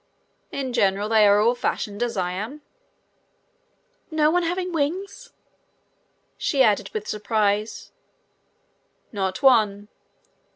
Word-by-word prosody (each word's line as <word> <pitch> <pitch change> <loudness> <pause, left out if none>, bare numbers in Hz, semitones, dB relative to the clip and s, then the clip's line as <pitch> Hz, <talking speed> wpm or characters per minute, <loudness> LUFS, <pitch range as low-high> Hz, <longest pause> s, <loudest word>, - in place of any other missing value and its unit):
"In 265 -3 -4
general 200 0 +1
they 220 -2 +5
are 205 0 +5
all 230 +3 +3
fashioned 210 -3 -3
as 240 -3 -2
I 180 -1 -1
am." 225 +11 -6 1.5
"No 310 -2 +2
one 355 +1 +2
having 360 +1 -2
wings?" 375 +11 -3 1.1
she 275 -3 +2
added 210 -4 +2
with 215 -1 -5
surprise. 210 0 -1 1.2
"Not 190 +1 -3
one." 210 -6 +3
220 Hz, 110 wpm, -23 LUFS, 205-290 Hz, 1.5 s, they